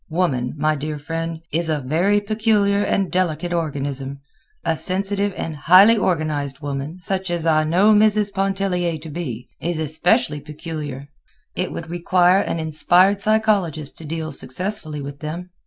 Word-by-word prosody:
Woman, 150 Hz, -8 st, 0 dB
my 155 Hz, +1 st, +1 dB
dear 150 Hz, +1 st, -4 dB
friend, 165 Hz, +2 st, -4 dB
is 165 Hz, +1 st, 0 dB
a 155 Hz, -, +1 dB
very 170 Hz, +10 st, +2 dB
peculiar 205 Hz, -1 st, +1 dB
and 195 Hz, -3 st, 0 dB
delicate 175 Hz, -1 st, 0 dB
organism—a 140 Hz, -, -4 dB
sensitive 200 Hz, +3 st, -1 dB
and 160 Hz, -, -4 dB
highly 185 Hz, +9 st, +7 dB
organized 155 Hz, -8 st, -1 dB
woman, 145 Hz, +2 st, -4 dB
such 190 Hz, -1 st, -2 dB
as 170 Hz, -2 st, -2 dB
I 155 Hz, -1 st, +3 dB
know 185 Hz, +7 st, +4 dB
Mrs. 210 Hz, -1 st, +3 dB
Pontellier 190 Hz, -3 st, 0 dB
to 155 Hz, +1 st, -10 dB
be, 130 Hz, -7 st, -5 dB
is 175 Hz, -1 st, -2 dB
especially 160 Hz, -, +1 dB
peculiar. 150 Hz, -2 st, -6 dB, 0.5 s
It 180 Hz, -, -2 dB
would 165 Hz, 0 st, -7 dB
require 180 Hz, +2 st, +3 dB
an 185 Hz, -, -1 dB
inspired 175 Hz, +5 st, +3 dB
psychologist 200 Hz, -9 st, +1 dB
to 160 Hz, -, -9 dB
deal 160 Hz, +1 st, -4 dB
successfully 155 Hz, +1 st, -4 dB
with 140 Hz, 0 st, -7 dB
them. 170 Hz, +4 st, -6 dB
165 Hz, 145 wpm, -21 LUFS, 150-195 Hz, 0.5 s, highly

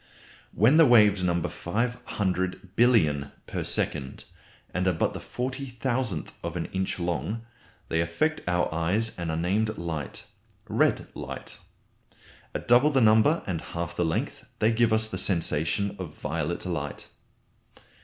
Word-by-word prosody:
When 120 Hz, +9 st, +4 dB
the 165 Hz, -3 st, +8 dB
waves 105 Hz, -5 st, +6 dB
number 85 Hz, -1 st, +1 dB
500 95 Hz, -3 st, -2 dB
billion 80 Hz, -, +3 dB
per -, -, -3 dB
second, 65 Hz, 0 st, -2 dB, 0.5 s
and 95 Hz, +1 st, 0 dB
are 90 Hz, -, +3 dB
but 80 Hz, -, 0 dB
the -, -, -5 dB
40,000th 125 Hz, -, -3 dB
of 85 Hz, 0 st, -4 dB
an 85 Hz, -, -2 dB
inch 95 Hz, 0 st, -1 dB
long 90 Hz, -, -2 dB, 0.4 s
they 80 Hz, -, +1 dB
affect 155 Hz, -, 0 dB
our 90 Hz, -2 st, +1 dB
eyes 95 Hz, +8 st, 0 dB
and 85 Hz, -2 st, -4 dB
are 80 Hz, -, -1 dB
named 105 Hz, +6 st, 0 dB
light 80 Hz, -5 st, -5 dB, 0.4 s
red -, -, +2 dB
light. -, -, -6 dB, 1.0 s
At -, -, -4 dB
double 120 Hz, +5 st, +6 dB
the 135 Hz, -3 st, +3 dB
number 110 Hz, +8 st, +5 dB
and 85 Hz, -4 st, -2 dB
half 85 Hz, 0 st, -5 dB
the 90 Hz, -, +1 dB
length, 80 Hz, -1 st, -2 dB
they 110 Hz, +1 st, +3 dB
give 115 Hz, 0 st, +3 dB
us 110 Hz, 0 st, +3 dB
the 95 Hz, -4 st, -4 dB
sensation 90 Hz, +2 st, 0 dB
of 85 Hz, -5 st, -6 dB
violet 80 Hz, +3 st, -3 dB
light. 75 Hz, -5 st, -4 dB
95 Hz, 145 wpm, -27 LUFS, 85-115 Hz, 1.0 s, the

